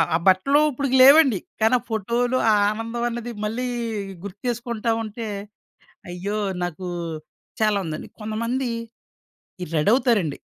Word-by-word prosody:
ఆ - - +5
బట్టలు 275 +11 +4
ఇప్పుడిక 275 0 -2
లేవండి. 275 - +7 0.2
కానీ 235 +3 +5
ఆ - - -15
ఫోటోలు 240 +4 0
ఆ - - +5 0.2
ఆనందం 230 +2 -3
అన్నది 235 0 -5
మళ్ళీ 235 +4 -2 0.6
గుర్తు 200 0 -9
చేసుకుంటా 235 -1 -2
ఉంటే 220 +1 -6 0.8
అయ్యో! 195 +4 -3 0.3
నాకు 175 +1 -5 0.8
చాలా 215 -1 +3
ఉందండి. 155 -1 -6
కొంతమంది 230 +4 -2 0.9
ఈ - - -4
రెడవుతారండి. 205 - +2
230 Hz, 120 wpm, -23 LUFS, 205-245 Hz, 0.9 s, లేవండి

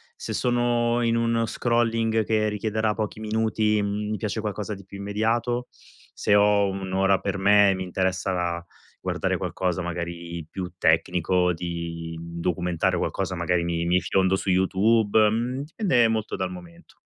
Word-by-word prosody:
se - - -6
sono 120 -1 +1
in 115 -1 +2
un 115 0 +1
scrolling 115 -1 +1
che 110 -1 +1
richiederà 110 +1 -1
pochi 110 -1 -3
minuti, 110 -1 +1
mhmm, 105 +1 -2
mi 110 - -1
piace 110 0 -3
qualcosa 105 0 -4
di 100 -1 -13
più 100 - -10
immediato, 115 +4 -1 0.5
se 105 - +2
ho 100 -1 +4
1 95 -1 -5
ora 95 0 +3
per 100 -1 -2
me 100 +1 +5
e - - 0
mi 95 - -4
interessa 90 -2 -1 0.4
guardare - - -1
qualcosa 90 -1 -2
magari 85 -1 -5
più 90 -2 -5
tecnico, 90 +1 +2
di 85 -1 -5
documentare 85 +1 -1
qualcosa, 95 +1 -2
magari 85 0 0
mi 85 0 -1
mi 90 +1 +3
fiondo 95 +2 +2
su 95 - -3
YouTube, 105 +3 +3
mhmm, 120 +5 -1
dipende 150 - +2
molto 110 -1 -2
dal 95 -1 -2
momento. 90 -2 -13
100 Hz, 155 wpm, -25 LUFS, 90-110 Hz, 0.5 s, me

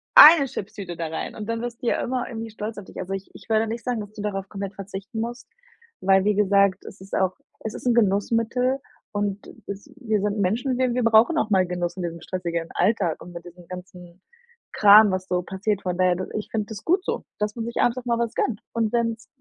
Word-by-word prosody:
1 330 - +11
Chipstüte 200 -7 -6
da 165 - -2
rein.“ 160 0 -5
Und 215 -1 -6
dann 230 0 -2
wirst 240 -1 -6
du - - -1
ja - - +1
immer 250 0 -2
irgendwie 225 -1 -6
stolz 215 +1 -6
auf 205 - -8
dich. - - -10
Also, 190 +1 -4
ich 195 0 -5
ich - - -15
würde 220 0 +3
nicht 230 +2 -4
sagen, 245 -3 -1
dass 205 0 -9
du 210 - -7
darauf 195 -2 -3
komplett 200 -1 -5
verzichten 195 +2 -7
musst, 240 +2 -4 0.5
weil, 195 0 +4
wie 210 0 +3
gesagt, 200 -1 +3
es 190 - -11
ist 195 - -6
auch 190 -1 +1 0.3
es 220 - -4
ist - - -9
'n 245 - +4
Genussmittel. 230 +4 +2 0.3
Und 205 -1 -2 0.2
wir - - -3
s 205 +9 -18
wir 220 -6 0
sind 205 +1 -1
Menschen, 235 +7 0
wir 255 -1 +1
wir 250 0 0
brauchen 230 +8 +5
auch 220 - +1
mal 190 -3 +4
Genuss 175 -1 -2
in 185 - -3
diesem 170 -1 -5
stressigen 170 -3 -3
Alltag 190 -4 +1
und 175 - -10
mit 170 0 -9
diesem 175 0 -13
ganzen 180 0 -10 0.5
Kram, 210 +1 +8
was 185 0 -2
so 180 0 0
passiert. 195 +2 -2
Von 180 -1 -2
daher 185 -1 +3
du 185 +1 -4
ich 210 - -5
finde 215 -2 -1
das 220 -3 -8
gut 365 +3 +2
so, - - -2 0.2
dass 210 0 -1
man 230 -2 -4
sich 235 - -5
abends 245 +1 +2
auch 255 - -6
mal 235 -1 +1
was 235 -1 -1
gönnt. 220 -5 -1
Und 225 -2 0
wenn's 230 -1 -1
210 Hz, 240 wpm, -24 LUFS, 190-230 Hz, 0.5 s, 1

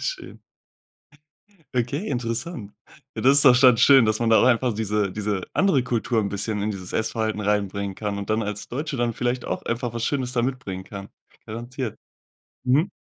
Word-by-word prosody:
Schön. - - -5 1.4
Okay, 140 - -1
interessant. 120 - -4 0.4
Ja, - - -3
das 135 +2 +6
ist - - +5
doch 125 -3 +7
dann 130 -2 +7
schön, 135 -4 +7
dass 110 +1 0
man 115 - +1
da 110 - +6
auch - - +4
einfach 125 0 +3
diese 105 -2 -1
diese 105 -2 -2
andere 185 -9 +3
Kultur 120 -2 0
'n 100 - -1
bisschen 105 +1 -2
in 105 - -1
dieses 95 -3 -7
Essverhalten 110 -1 -1
reinbringen 100 -1 -1
kann 105 -2 -3
und 100 +1 -5
dann 110 +1 +1
als 105 0 -5
Deutsche 145 +3 -4
dann 120 -1 0
vielleicht 120 +2 -2
auch - - -3
einfach 120 0 -2
was 115 0 -3
Schönes 130 -3 -1
da 120 -2 +1
mitbringen 110 -8 -4
kann. 100 0 -9 0.4
Garantiert. 120 +1 -6 0.6
Mhm. 140 +7 +2
115 Hz, 185 wpm, -24 LUFS, 105-125 Hz, 1.4 s, doch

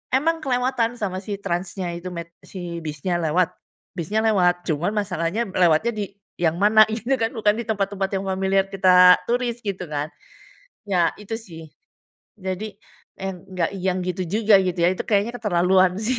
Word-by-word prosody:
emang 325 +4 +1
kelewatan 245 -2 0
sama 190 -3 -2
si 200 0 -5
transnya 180 0 -3
itu 180 +1 -6
met 170 0 -7
si 175 -3 -6
bisnya 155 +4 -2
lewat 165 +2 +1 0.4
bisnya 190 +6 -1
lewat, 180 -4 +2
cuman 165 +5 0
masalahnya 200 +2 -1
lewatnya 180 +6 +3
di 205 -1 -2 0.3
yang 165 -1 +2
mana 215 +1 +7
gitu 235 +4 0
kan 225 - +1
bukan 210 -3 +2
di - - -2
tempat-tempat 200 -2 -1
yang 190 - -2
familiar 190 0 +1
kita 180 -1 +6
turis 240 0 -1
gitu 190 -2 -3
kan. 150 0 -2 0.8
Ya, 175 -4 +2
itu 210 +2 -5
sih. 165 -6 -11 0.8
Jadi 190 +3 -5 0.4
n 190 -2 -6
enggak 180 -2 -1
yang 185 0 0
gitu 180 +1 -2
juga, 210 +2 +4
gitu 180 -2 -1
ya, 175 - +5
itu - - -4
kayaknya 210 +2 +1
keterlaluan 185 -2 +3
sih. 245 +2 0
190 Hz, 165 wpm, -23 LUFS, 175-215 Hz, 0.8 s, mana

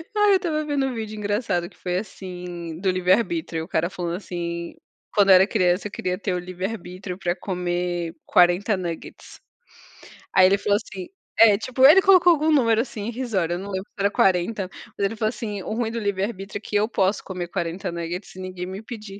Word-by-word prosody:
Aí 415 -1 +4
eu - - +6
estava 310 -5 -2
vendo 285 -2 0
um 255 - -3
vídeo 215 -2 -5
engraçado 205 -4 -1
que - - -24
foi 180 0 -2
assim, 180 -4 -7
do 190 0 0
livre 185 0 +3
arbítrio, 230 - -1
o - - -9
cara 170 -1 0
falando 175 -2 -4
assim: 170 -3 -5 0.4
"Quando 200 -2 +4
eu 190 - +10
era 190 +2 +6
criança 180 +2 +1
eu - - -12
queria 180 0 -2
ter 195 -3 -2
o 180 - -1
livre 185 +1 -5
arbítrio 185 -3 -6
pra 175 -2 -1
comer 175 -2 -2
40 180 +4 +4
nuggets". 175 -3 -7 0.9
Aí 185 - +7
ele 195 +2 +4
falou 205 0 +2
assim, 190 -3 -8 0.3
é 210 -3 +7
tipo 260 +3 +2
ele 370 +7 +9
colocou 365 -2 +6
algum 315 0 +2
número 230 -6 +4
assim 220 -4 -6
irrisório, 215 -9 -1
não 200 +1 -7
lembro 190 +1 -4
se - - -51
era 200 +1 +2
40, 190 +1 +1 0.3
mas 200 - +1
ele 225 - -2
falou 215 0 +1
assim: 210 -4 -5
"O - - -4
ruim 225 -1 -1
do 230 - -3
livre 200 -2 -1
arbítrio 200 -2 -4
é - - -24
que 210 - -6
eu 210 +1 +2
posso 195 -3 0
comer 180 -2 -5
40 175 +2 -3 0.3
sem 185 - -11
ninguém 185 -1 -5
me 190 +2 -6
impedir". 215 -3 -9
195 Hz, 210 wpm, -23 LUFS, 180-225 Hz, 0.9 s, eu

